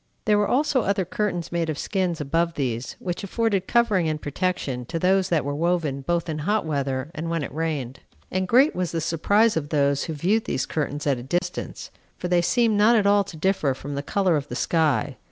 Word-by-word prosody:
There 210 -1 +4
were 205 - +2
also 275 -1 +2
other 200 -2 0
curtains 180 -2 -2
made 170 -1 -1
of 155 - -2
skins 180 -3 -1
above 165 +4 0
these, 125 -3 -3
which 175 0 -4
afforded 200 -2 0
covering 210 -8 +2
and 155 -1 -2
protection 145 -5 -2
to 165 +7 -4
those 190 +2 +2
that 160 -5 +1
were 145 - -2
woven 160 -3 0
both 170 +4 -1
in 155 -2 -3
hot 205 +5 0
weather 140 -1 -2
and 165 -2 -4
when 165 -2 -1
it - - -6
rained. 150 -5 -3 0.3
And 185 0 -1
great 260 - +4
was 180 -2 -1
the 165 - 0
surprise 200 +8 +2
of 150 -3 -2
those 140 -2 +1
who 160 - -4
viewed 195 +9 +1
these 130 - -1
curtains 145 -1 -3
at 140 -4 +1
a - - -7
distance, 175 +7 -3 0.3
for 180 - -4
they 175 -1 +3
seemed 225 +4 +2
not 225 +3 +6
at 210 -3 +3
all 200 0 +4
to 175 -4 -10
differ 155 -6 +1
from 145 +2 -7
the 140 - -2
color 185 +3 +1
of 145 0 -4
the - - -6
sky. 150 -4 +1
170 Hz, 220 wpm, -24 LUFS, 145-195 Hz, 0.3 s, not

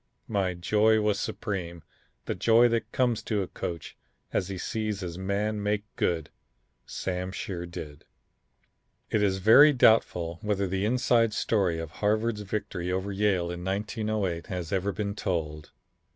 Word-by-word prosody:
My 95 -4 0
joy 105 +5 +3
was 105 -2 +1
supreme; 90 -9 -4 0.4
the - - -1
joy 115 +1 +5
that 115 0 -1
comes 120 -3 +1
to 105 -3 -1
a - - -6
coach 85 -1 -6 0.4
as 90 - 0
he 95 - -4
sees 105 +2 -3
his 90 -1 -5
man 105 +2 -1
make 105 0 0
good 80 -3 -1 0.6
Sam 90 0 -3
sure 90 -2 -5
did." 75 -4 -9 1.1
It 110 - +2
is 95 -2 +2
very 115 +10 +7
doubtful 90 - +3
whether 100 -2 0
the 95 +2 -1
inside 115 -1 +2
story 95 -9 +1
of 80 -2 -5
Harvard's 110 +3 0
victory 95 -3 -3
over 95 +2 -2
Yale 95 -3 +1
in 90 0 -6
1908 100 -2 -2
has 90 -3 -5
ever 100 +1 0
been 100 0 -3
told. 75 -7 -3
100 Hz, 150 wpm, -28 LUFS, 90-110 Hz, 1.1 s, very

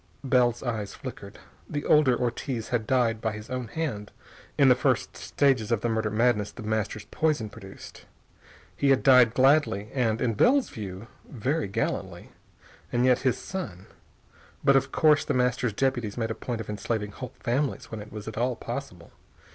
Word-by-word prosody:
Bell's 125 -3 +2
eyes 110 -5 -3
flickered. - - -9 0.3
The 145 - -3
older 140 -5 +4
Ortiz 120 -1 -3
had 115 -3 -1
died 115 -4 +1
by 110 -2 -1
his 105 +2 -9
own 125 -2 -3
hand 115 -6 -4 0.5
in 140 -2 +5
the 125 - +8
first 125 - 0
stages 130 -6 +1
of 115 -2 +1
the 120 - 0
murder 110 -1 0
madness 110 -1 +1
The 120 - -10
Master's 110 -1 -2
poison 145 -10 0
produced. 95 0 -12 0.7
He 140 - +1
had 135 -1 +3
died 125 -4 +6
gladly 130 -7 +3
and, 115 -4 +1
in 120 -2 0
Bell's 265 - +3
view, 100 -1 -7 0.2
very 140 +4 -1
gallantly. 95 - -3 0.6
And 120 +1 +2
yet 125 -1 +4
his 130 -2 +1
son.... 165 - -6 0.8
But 140 -1 +5
of 135 0 +2
course 150 -2 +4
The - - -1
Master's 125 -2 +1
deputies 120 -3 -1
made 115 -1 -1
a - - 0
point 115 0 -5
of 110 - -8
enslaving 105 0 -3
whole 125 +3 -8
families 130 +4 -2
when 110 -2 -5
it 105 - -11
was 105 0 -8
at 110 0 -5
all 125 +1 +1
possible. 115 -9 -7
120 Hz, 175 wpm, -27 LUFS, 110-130 Hz, 0.8 s, the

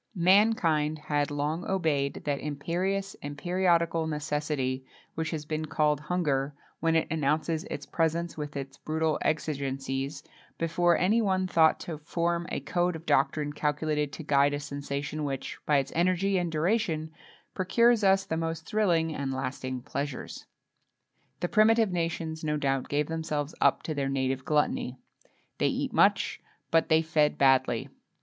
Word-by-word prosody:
Mankind 170 -5 +3
had 145 -1 -1
long 150 +4 -2
obeyed 155 -7 0
that 145 -2 0
imperious 180 +7 -2
and 145 0 -6
periodical 170 -1 +1
necessity 150 -3 -2 0.3
which 160 -1 -2
has 155 -2 -4
been 155 +1 -2
called 150 -1 +1
hunger, 150 -4 -1 0.2
when 165 0 +1
it 160 - +2
announces 155 +2 0
its 230 - -6
presence 165 +1 -1
with 150 -1 -5
its 135 0 -6
brutal 160 0 -1
exigencies, 140 -2 -2 0.3
before 170 +1 +2
any 210 +6 +3
one 190 -3 +1
thought 165 -3 +4
to 160 -3 -6
form 170 +2 -1
a - - -2
code 175 +5 0
of 160 +1 -9
doctrine 145 +2 +1
calculated 150 0 -1
to 160 - -7
guide 145 0 +3
a - - -3
sensation 145 +1 -4
which, 135 -2 -4
by 150 - +4
its 135 0 -1
energy 185 +3 +2
and 175 -2 -2
duration, 160 -2 0 0.4
procures 230 +4 +3
us 195 0 +4
the 160 - -2
most 165 0 -3
thrilling 170 -7 +1
and 140 -2 -3
lasting 130 -1 -4
pleasures. 140 -1 -5 0.9
The 175 - +1
primitive 220 +1 +4
nations 165 -2 -2
no 150 -1 0
doubt 135 -2 -1
gave 145 +1 +1
themselves 160 -2 -3
up - - +3
to 155 - -3
their 140 -2 -1
native 130 -1 -1
gluttony. 150 -4 0 0.6
They - - +3
eat - - -2
much, - - +3 0.3
but 165 0 +3
they 160 0 +4
fed 155 -2 +2
badly. 130 -4 +3
155 Hz, 150 wpm, -28 LUFS, 145-170 Hz, 0.9 s, thought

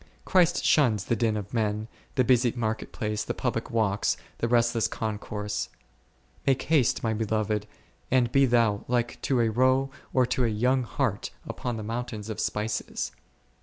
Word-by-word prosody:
Christ 180 -2 +3
shuns 115 - +3
the 115 - +1
din 110 -1 +1
of 105 -1 -6
men, 110 -1 0 0.3
the 130 - +4
busy 125 -1 +4
market 110 -2 -2
place, 105 0 -2
the - - -3
public 115 -2 -2
walks, 110 -4 +1 0.2
the 115 - +1
restless 120 -1 +3
concourse: 105 -1 -3 0.8
Make 135 -1 +3
haste 150 -7 +2
my 110 -1 +1
Beloved, 110 -1 -1 0.4
and 125 -2 +3
be 135 0 +5
Thou 115 -4 +2
like 120 -1 -1
to 130 -3 +1
a 115 - +3
roe 130 +4 +2 0.2
or 130 -1 +3
to 125 +1 0
a - - +3
young 125 +5 +2
hart 120 -3 -1 0.2
upon 120 -2 -3
the 110 - -5
mountains 115 -1 -4
of 110 - -6
spices. 105 +1 -2
115 Hz, 165 wpm, -27 LUFS, 110-125 Hz, 0.8 s, be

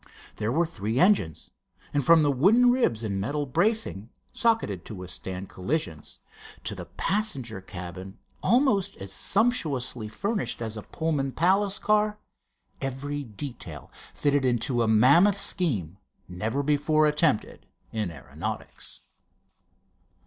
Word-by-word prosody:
There 110 +1 -1
were 165 +6 +2
three 115 - -2
engines, 180 - +2 0.4
and 145 - +1
from 165 +2 +6
the 145 - +3
wooden 215 - +5
ribs 235 - +1
and 100 -3 -2
metal 145 +7 -1
bracing, 145 - 0 0.2
socketed 225 - +1
to 110 - -7
withstand 90 +1 -6
collisions, 95 - -3 0.4
to - - -1
the - - -7
passenger 135 - -1
cabin 95 +1 -8 0.2
almost 215 -7 +2
as 95 0 -5
sumptuously 150 - 0
furnished 195 - -3
as 110 -2 -4
a 110 - -5
Pullman 145 -1 -2
palace 195 +4 +2
car, 210 0 +2 0.6
every 140 +2 -3
detail 110 - -8 0.2
fitted 145 -1 +2
into 120 0 +1
a 115 - +2
mammoth 140 - +5
scheme 115 - 0 0.3
never 110 +10 -2
before 150 +2 +3
attempted 150 -5 +1 0.2
in 110 -4 -2
aeronautics. 85 - -6
140 Hz, 120 wpm, -27 LUFS, -, 0.6 s, from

